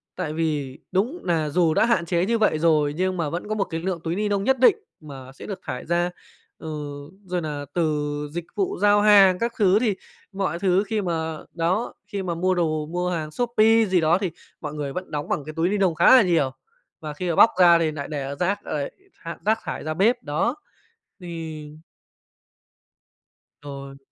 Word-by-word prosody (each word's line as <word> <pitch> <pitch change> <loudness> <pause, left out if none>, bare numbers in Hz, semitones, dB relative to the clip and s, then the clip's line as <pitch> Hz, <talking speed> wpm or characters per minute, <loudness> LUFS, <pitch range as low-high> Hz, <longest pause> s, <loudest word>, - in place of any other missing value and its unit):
tại 160 -4 -3
vì 150 -5 -2
đúng 235 - 0
nà 160 -4 0
dù 165 0 +2
đã - - +3
hạn 235 -8 +1
chế 175 +1 +1
như 230 +2 +1
vậy 215 -8 +2
rồi 155 -3 +2
nhưng 185 +2 -1
mà 160 -3 -1
vẫn 175 +5 -5
có 215 - -1
một 200 - +1
cái 165 -3 -5
lượng 180 -2 -2
túi 165 +1 -2
ni 210 +2 -1
nông 200 -1 0
nhất 265 +1 +2
định 255 - +6 0.2
mà 135 -4 -10
sẽ 135 - -12
được 200 - -6
thải - - -5
ra, 175 +1 +1 0.5
ừ, 160 - -10 0.6
rồi 180 -1 -2
nà 145 -2 -4
từ 155 -4 0 0.3
dịch 170 +1 -5
vụ 395 0 -1
giao 205 0 +5
hàng 195 -3 +6
các 235 0 -1
thứ. 200 -1 +4
Thì 220 -5 +1 0.4
mọi 190 -4 -2
thứ 190 +1 +2
khi 215 0 -1
mà 160 -3 -2 0.2
đó, 180 +7 -1
khi 200 -2 -4
mà 175 -2 -2
mua 185 +2 +1
đồ, 155 -3 0
mua 180 +3 -2
hàng 155 -3 -3
Shopee 225 -1 +3
gì 185 -3 +2
đó 160 +3 +3
thì 190 -4 -2 0.3
mọi 150 -2 -5
người 145 -2 -4
vẫn 185 0 -6
đóng 150 -1 -4
bằng 145 - -1
cái 155 - -7
túi 165 +2 +1
ni 210 - 0
nông 185 -5 +2
khá 170 +10 +7
là 255 - +8
nhiều, 165 -9 +2 0.5
và 150 -2 -6
khi 175 +4 -4
mà 165 - 0
bóc 225 - +7
ra 175 -2 +7
thì 165 - +1
lại 155 - 0
nại 145 -2 -6
để, 145 -3 -4
ờ, 140 +1 -5
rác 190 +6 -1
rồi 145 -2 -3 0.3
tha 170 -2 -6
rác 220 +1 +2
thải - - -5
ra 155 +1 -2
bếp. 230 +8 +2
Đó, 165 - -1 0.6
thì 165 -4 -7 1.9
Rồi. 140 -1 -8
175 Hz, 215 wpm, -24 LUFS, 155-200 Hz, 1.9 s, là